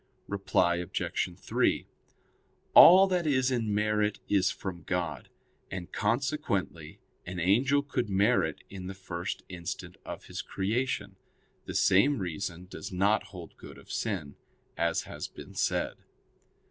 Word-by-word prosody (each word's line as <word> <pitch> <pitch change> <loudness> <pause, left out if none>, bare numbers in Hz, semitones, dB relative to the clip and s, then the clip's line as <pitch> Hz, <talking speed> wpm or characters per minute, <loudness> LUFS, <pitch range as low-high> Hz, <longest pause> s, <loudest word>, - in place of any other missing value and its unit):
Reply 95 -3 +1
Obj. 90 -1 -2
3: - - +1 0.9
All 185 +3 +10
that 180 -4 0
is 130 -2 +2
in 115 -4 0
merit 105 0 +1
is 95 -2 +3
from 90 -3 -5
God; 90 0 -3 0.4
and 90 -2 -6
consequently 105 - -1 0.3
an 90 0 -4
angel 130 +11 +3
could 125 -5 -2
merit 100 -5 +2
in 95 -2 -8
the 95 - -6
first 90 -1 -5
instant 85 -3 -6
of - - -8
his - - -5
creation. 105 -1 -2 0.5
The - - -5
same 115 +10 +4
reason 90 -2 -4
does 95 +1 -8
not 100 +3 +2
hold 90 -5 -11
good - - -11
of - - -13
sin; 90 -11 -3 0.4
as 85 0 0
has - - -6
been - - -12
said. - - 0
100 Hz, 135 wpm, -29 LUFS, 90-115 Hz, 0.9 s, All